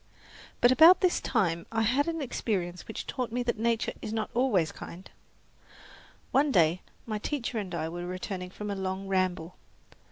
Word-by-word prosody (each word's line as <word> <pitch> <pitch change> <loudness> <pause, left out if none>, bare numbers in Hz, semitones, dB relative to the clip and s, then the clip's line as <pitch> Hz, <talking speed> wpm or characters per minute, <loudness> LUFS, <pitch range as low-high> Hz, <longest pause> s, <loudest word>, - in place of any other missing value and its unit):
But 245 - +6
about 320 +7 +8
this 365 -2 +2
time 170 -8 0
I 225 0 +1
had 260 +7 +2
an 330 -2 -2
experience 185 -8 -3
which 220 - -6
taught 250 -4 -3
me 245 +1 -1
that 240 -2 -1
nature 230 0 0
is - - -5
not 220 -1 -2
always 225 -10 +2
kind. 180 +3 -10 1.2
One 280 +2 +3
day 170 -3 +3 0.2
my 215 -2 -3
teacher 240 -2 -2
and 190 -4 -5
I 160 -1 -2
were 175 +2 -5
returning 185 0 -5
from 210 +2 -6
a - - -2
long 190 0 -3
ramble. 185 -3 -1
210 Hz, 170 wpm, -29 LUFS, 180-245 Hz, 1.2 s, about